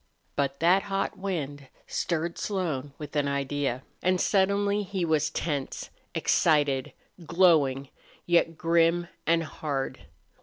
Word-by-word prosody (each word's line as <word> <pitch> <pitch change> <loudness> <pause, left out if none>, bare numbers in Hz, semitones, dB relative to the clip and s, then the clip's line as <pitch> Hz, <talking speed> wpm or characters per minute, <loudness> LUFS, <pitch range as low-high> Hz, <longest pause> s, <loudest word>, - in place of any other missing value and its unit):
But 140 -1 -1
that 180 +4 +5
hot 195 0 -1
wind 145 -8 -4 0.2
stirred 170 0 -2
Slone 160 -9 -2
with 150 0 -8
an 145 -1 +2
idea, 140 -2 -1 0.2
and 185 0 +2
suddenly 200 +2 +2
he 190 -3 -2
was 155 -1 +2
tense, 145 -4 -3 0.2
excited, 145 -4 +2 0.3
glowing, 155 -6 +3 0.4
yet 170 -2 +2
grim 170 +1 +2 0.2
and 165 0 +3
hard. 145 -3 -4
165 Hz, 115 wpm, -27 LUFS, 140-180 Hz, 0.4 s, that